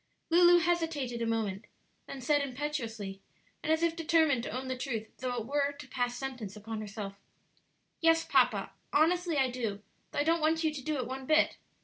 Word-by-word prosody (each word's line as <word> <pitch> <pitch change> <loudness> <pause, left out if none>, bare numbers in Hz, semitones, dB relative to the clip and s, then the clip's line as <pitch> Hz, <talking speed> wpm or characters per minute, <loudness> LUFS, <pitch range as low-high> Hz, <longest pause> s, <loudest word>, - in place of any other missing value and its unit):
Lulu 350 +1 +7
hesitated 325 -8 0
a 230 - 0
moment, 220 -2 -1 0.4
then 270 - -7
said 290 +3 +3
impetuously, 240 -8 -4 0.4
and 315 - -1
as 320 +1 +2
if 335 -1 +2
determined 320 -5 +3
to - - -5
own 255 +3 -4
the 260 - -2
truth 235 -4 -4
though 250 0 -2
it 230 -3 -3
were 285 +2 0
to 290 +1 -11
pass 245 -1 -1
sentence 250 -7 -5
upon 215 +1 -5
herself, 200 -1 -6 0.8
"Yes, 330 0 +4
papa, - - +3 0.2
honestly 335 +1 +3
I 265 -2 +2
do; 220 -5 -3 0.3
though - - -8
I 290 - +3
don't 330 +1 +2
want 320 +1 +2
you 315 -1 +1
to 290 - -5
do 305 +3 -2
it 255 - -2
one 260 +1 -6
bit. 310 0 +3
270 Hz, 195 wpm, -31 LUFS, 230-315 Hz, 0.8 s, Lulu